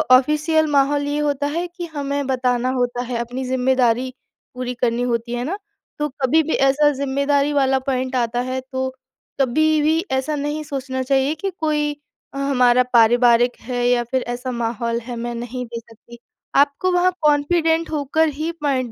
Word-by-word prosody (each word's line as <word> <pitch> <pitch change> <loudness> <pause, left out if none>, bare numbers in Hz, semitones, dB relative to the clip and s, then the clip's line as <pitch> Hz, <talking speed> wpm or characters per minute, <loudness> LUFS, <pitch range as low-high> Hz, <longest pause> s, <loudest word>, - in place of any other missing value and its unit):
Official 305 +4 +2
माहौल 285 +1 +2
ये 290 +1 -1
होता 290 -1 0
है 335 +4 -2
कि 345 0 -7
हमें 285 -3 -3
बताना 250 -1 0
होता 245 0 -1
है, 245 -1 -3
अपनी 245 +3 -4
ज़िम्मेदारी 255 -1 +1 0.4
पूरी 250 0 -3
करनी 240 -1 0
होती 235 +1 -3
है 245 0 -2
ना। 365 +8 -3 0.4
तो 295 0 0
कभी 310 +5 +3
भी 315 - -2
ऐसा 280 +2 +3
ज़िम्मेदारी 280 +1 0
वाला 270 -2 +2
पॉइंट 260 0 -1
आता 240 -1 0
है 260 0 -2
तो 260 0 -1 0.5
कभी 310 +4 +2
भी 315 +2 +2
ऐसा 265 +3 0
नहीं 295 +2 -3
सोचना 265 -3 -4
चाहिए 270 +3 +1
कि 390 +5 -3
कोई 300 -2 0 0.4
हमारा 250 -3 +3
पारिवारिक 240 +1 +4
है 245 0 -1
या 245 -1 +3
फिर 255 +2 -1
ऐसा 255 +1 -5
माहौल 235 0 -2
है 245 +1 -6
मैं 240 +1 -4
नहीं 245 +1 -5
दे 235 0 -6
सकती। 230 +1 -16 0.4
आपको 285 +6 +3
वहाँ 360 +1 +3
कॉन्फिडेंट 320 +2 +2
होकर 310 +2 +1
ही 310 +4 -3
पॉइंट 260 -4 0
265 Hz, 170 wpm, -21 LUFS, 245-295 Hz, 0.5 s, पारिवारिक